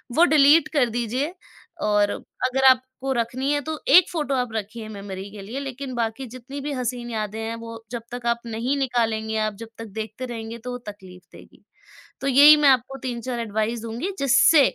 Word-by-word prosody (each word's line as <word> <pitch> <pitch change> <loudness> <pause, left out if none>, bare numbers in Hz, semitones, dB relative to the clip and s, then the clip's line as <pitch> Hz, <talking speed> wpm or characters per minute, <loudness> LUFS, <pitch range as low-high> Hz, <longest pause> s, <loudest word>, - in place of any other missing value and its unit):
वो 340 - +6
डिलीट 300 0 +5
कर 255 -5 +3
दीजिए 245 +8 -2 0.5
और 205 -1 +3
अगर 265 +1 -2
आपको 260 +1 0
रखनी 250 +3 -1
है 290 - 0
तो 310 +1 -5
एक 340 +5 +7
फ़ोटो 295 -5 -1
आप 250 -3 -2
रखिए 220 +1 -5
मेमोरी 200 -2 -7
के 210 - -9
लिए। 225 +8 -6
लेकिन 270 -1 -6
बाकी 230 +2 -2
जितनी 255 +4 -8
भी 290 +1 -4
हसीन 245 -1 -3
यादें 215 -1 -4
हैं 225 +1 -3
वो 230 0 -9
जब 235 -2 -5
तक 245 -1 -7
आप 235 0 +1
नहीं 235 +5 -2
निकालेंगे, 225 -4 0
आप 215 -1 0
जब 230 +2 -10
तक 225 - -7
देखते 220 +4 -6
रहेंगे 230 -1 -6
तो 250 +2 -7
वो 245 - -4
तकलीफ़ 185 -3 -11
देगी। - - -17 0.6
तो 270 - -4
यही 285 +3 +8
मैं 295 -1 +4
आपको 260 +1 +2
3-4 245 -1 -4
एडवाइस 220 +1 -2
दूँगी 235 - -4
जिससे 275 +3 +5
240 Hz, 190 wpm, -23 LUFS, 220-270 Hz, 0.6 s, यही